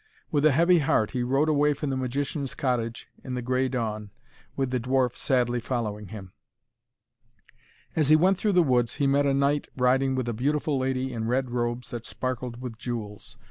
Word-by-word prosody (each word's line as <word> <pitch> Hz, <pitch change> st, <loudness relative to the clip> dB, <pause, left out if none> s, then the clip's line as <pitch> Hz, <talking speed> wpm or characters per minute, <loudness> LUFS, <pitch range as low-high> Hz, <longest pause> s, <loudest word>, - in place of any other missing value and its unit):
With 150 Hz, 0 st, +4 dB
a -, -, +4 dB
heavy 170 Hz, +5 st, +4 dB
heart 110 Hz, -7 st, +1 dB
he 125 Hz, -, -2 dB
rode 135 Hz, +5 st, +2 dB
away 150 Hz, -1 st, +3 dB
from 140 Hz, 0 st, -3 dB
the -, -, -1 dB
magician's 135 Hz, +2 st, -3 dB
cottage 120 Hz, -3 st, -2 dB, 0.2 s
in 130 Hz, -2 st, -4 dB
the 125 Hz, -, -2 dB
grey 130 Hz, +1 st, +1 dB
dawn, 110 Hz, -4 st, -3 dB, 0.5 s
with 135 Hz, -2 st, -1 dB
the 125 Hz, -, 0 dB
dwarf 125 Hz, 0 st, +1 dB
sadly 125 Hz, -2 st, +1 dB
following 110 Hz, -4 st, -3 dB
him. 95 Hz, -3 st, -9 dB, 1.6 s
As 155 Hz, -3 st, +2 dB
he 155 Hz, -, +8 dB
went 185 Hz, +4 st, +3 dB
through 210 Hz, -2 st, +1 dB
the 180 Hz, -1 st, +5 dB
woods 125 Hz, -4 st, +1 dB
he 140 Hz, -, 0 dB
met 140 Hz, +1 st, +3 dB
a 140 Hz, -, +2 dB
knight 140 Hz, +1 st, +1 dB
riding 130 Hz, +1 st, +2 dB
with 130 Hz, -2 st, -2 dB
a 120 Hz, -, -1 dB
beautiful 145 Hz, +4 st, 0 dB
lady 130 Hz, 0 st, -1 dB
in 110 Hz, -1 st, -3 dB
red 125 Hz, +1 st, 0 dB
robes 120 Hz, 0 st, -2 dB
that 120 Hz, -2 st, -5 dB
sparkled 125 Hz, -1 st, -4 dB
with 115 Hz, -3 st, -7 dB
jewels. 110 Hz, -4 st, -6 dB
130 Hz, 190 wpm, -26 LUFS, 120-140 Hz, 1.6 s, he